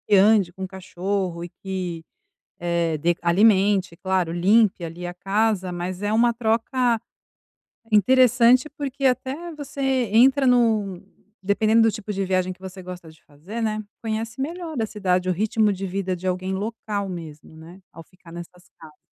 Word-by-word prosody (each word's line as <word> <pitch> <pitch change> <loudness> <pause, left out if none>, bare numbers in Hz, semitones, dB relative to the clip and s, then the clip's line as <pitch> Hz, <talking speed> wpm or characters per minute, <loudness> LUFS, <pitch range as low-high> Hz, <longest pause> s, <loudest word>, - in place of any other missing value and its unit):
ande 200 -2 +4
com 190 +1 -6
cachorro, 185 -1 -4
eh, 175 - -7
que 180 -4 -4 1.0
de 170 +2 +2
alimente, 190 0 +3
claro, 185 -2 -1
limpe 195 +2 +3
ali 170 +2 -7
a 175 - -6
casa 195 0 0
mas 180 +1 -5
é 205 0 -1
uma 235 +2 +3
troca 230 +1 0 0.9
interessante, 250 +4 +5
porque 280 -2 -5
até 270 +6 -1
você 285 -1 -7 0.3
entra 265 +4 +5
num, 220 -7 +2 0.4
dependendo 215 +3 +3
do 225 - +4
tipo 210 0 -6
de 195 0 -1
viagem 185 0 0
que 185 - -27
você 190 0 -9
gosta 180 -2 -9
de 160 - -23
fazer, 170 +11 -8
né, 215 -1 -1 0.2
conhece 225 +2 -4
melhor 330 +2 -5
da 225 - 0
cidade 185 -4 -1
o - - +3
ritmo 215 +3 +1
de 195 +1 -5
vida 185 0 -2
de 180 +1 -6
alguém 185 +1 -2
local 205 0 -3
mesmo 160 -3 -9
né 170 +4 -13
ao 165 - -11
ficar 180 -1 -18
nessas 175 +1 -11
casas. 155 -2 -14
195 Hz, 155 wpm, -23 LUFS, 180-225 Hz, 1.0 s, interessante